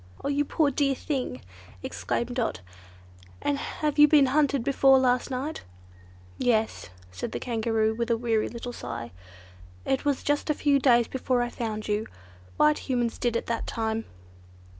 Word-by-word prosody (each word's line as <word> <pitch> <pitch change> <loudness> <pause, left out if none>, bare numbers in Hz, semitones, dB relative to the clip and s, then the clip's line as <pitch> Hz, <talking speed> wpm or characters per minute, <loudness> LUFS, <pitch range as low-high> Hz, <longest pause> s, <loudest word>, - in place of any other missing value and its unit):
"Oh! - - -1
you 285 0 +1
poor 295 -1 +1
dear 275 0 +1
thing!" 255 - -3 0.4
exclaimed 95 - -3
Dot, 240 - -1 0.8
"and 285 -1 -1
have 300 0 -2
you 295 - +9
been 295 -2 +6
hunted 280 -1 +2
before 270 0 +5
last 250 0 +2
night?" 270 +4 -4 0.8
"Yes," 225 - 0 0.2
said 90 - -5
the - - -3
Kangaroo 225 -2 0
with 235 +1 -3
a 230 - +3
little 230 - -8
weary 225 -2 +1 0.2
sigh. 120 - -6 0.7
"It 270 - 0
was 285 -2 0
just 290 +2 0
a 300 - +2
few 285 -2 +3
days 240 -4 +4
before 255 -1 0
I 240 - -3
found 220 -3 -4
you. 210 +1 -1 0.5
White 300 0 +4
Humans 240 -3 0
did 240 -1 0
it 230 - -1
that 230 -1 -3
time." 225 -1 -2
245 Hz, 160 wpm, -27 LUFS, 225-280 Hz, 0.8 s, you